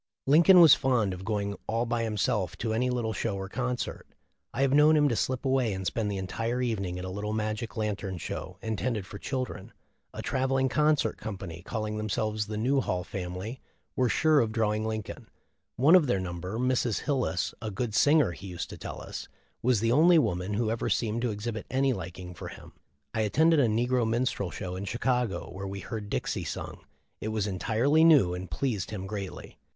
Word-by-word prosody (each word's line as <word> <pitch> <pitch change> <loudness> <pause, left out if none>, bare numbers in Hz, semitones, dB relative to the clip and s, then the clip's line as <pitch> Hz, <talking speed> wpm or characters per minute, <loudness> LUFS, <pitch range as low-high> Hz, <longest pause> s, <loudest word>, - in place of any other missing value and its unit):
Lincoln 170 +6 +7
was 160 -5 +10
fond 120 -8 +2
of 90 +1 -7
going 100 -1 -2
all 115 +2 0
by 115 0 -1
himself 105 -3 -1
to 110 -1 -2
any 125 +3 +1
little 120 -3 -1
show 110 -2 -2
or 95 0 -4
concert. 125 +3 -3 0.4
I 135 - 0
have 135 -1 +2
known 150 +2 +6
him 145 -1 +4
to 120 - 0
slip 130 +4 -1
away 130 -5 +2
and 95 0 -5
spend 110 +2 -1
the 100 - -3
entire 115 +6 -2
evening 100 -8 -1
at 90 - -5
a - - -4
little 105 +2 -3
magic 110 +1 -3
lantern 100 -3 -2
show - - -6
intended 110 -1 -2
for 100 +2 -9
children. 130 +1 -4 0.4
A - - -7
travelling 130 0 +1
concert 150 -5 +2
company, 95 -6 -6
calling 110 +2 -3
themselves 110 0 -1
the 105 0 -4
'Newhall 120 -6 +1
Family,' 95 +6 -6 0.3
were 125 -1 +2
sure 155 +3 +4
of 115 -4 +1
drawing 110 -1 0
Lincoln. 110 -2 -5 0.5
One 140 +7 +5
of 180 -6 +7
their 100 -6 +1
number, 90 +3 -4
Mrs. 125 -2 +1
Hil 140 -2 0
lis, 95 -7 -1
a 110 - -3
good 110 +2 -3
singer, 145 - +4
he 95 +3 -9
used 90 -2 -5
to - - -9
tell - - -7
us - - -7 0.3
was 120 -4 +2
the 115 0 +2
only 165 +6 +6
man 90 - 0
who 110 0 0
ever 115 - -1
seemed 115 0 0
to 125 - 0
exhibit 110 +1 -4
any 135 +1 +2
liking 90 -2 -7
for 85 - -8
him. - - -11 0.4
I 110 - 0
attended 155 +10 +4
a 130 - +4
negro 120 +1 +1
minstrel 115 -5 0
show 90 +2 -5
in 95 +2 -5
Chicago, 120 -4 -1
where 95 +1 -5
we 100 0 -5
heard 105 -3 -6
Dixie - - -2
sung. - - -5 0.4
It - - -4
was 110 -2 -1
entirely 115 - +2
new, 145 - +6
and 90 0 -6
pleased 105 - -2
him 95 -3 -5
greatly. 100 -1 -7
110 Hz, 200 wpm, -28 LUFS, 100-125 Hz, 0.5 s, was